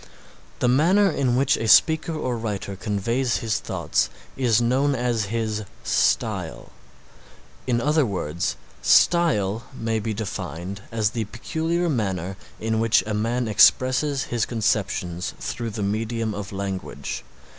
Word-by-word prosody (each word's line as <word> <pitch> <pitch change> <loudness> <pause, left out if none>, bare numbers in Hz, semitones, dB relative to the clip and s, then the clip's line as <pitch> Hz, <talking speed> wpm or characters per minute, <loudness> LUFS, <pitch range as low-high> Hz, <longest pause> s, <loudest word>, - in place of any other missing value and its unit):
The - - +1
manner 180 +11 +4
in 125 -3 +1
which 135 +1 +3
a 115 - -2
speaker 160 +7 +5
or 130 -5 -2
writer 105 -3 -4
conveys 115 +6 -1
his 110 -4 -1
thoughts 65 -1 -1 0.3
is 120 -4 +2
known 130 +4 +2
as 120 -3 0
his 110 0 -2 0.2
Style. - - 0 1.0
In 120 -2 +2
other 150 +4 +2
words 85 - -2 0.3
Style 115 - +3
may 115 -2 -1
be 110 0 -3
defined 95 -2 -5
as 110 -2 +1
the 115 -2 -2
peculiar 160 - -2
manner 95 - -1 0.2
in 110 0 -1
which 115 -3 +3
a 110 - -3
man 115 +3 0
expresses 130 +6 +4
his 120 -3 -1
conceptions 100 -6 -1
through 115 -1 -4
the 105 -1 -4
medium 110 +2 -1
of 100 0 -6
language. 95 -1 -5
115 Hz, 135 wpm, -24 LUFS, 100-125 Hz, 1.0 s, speaker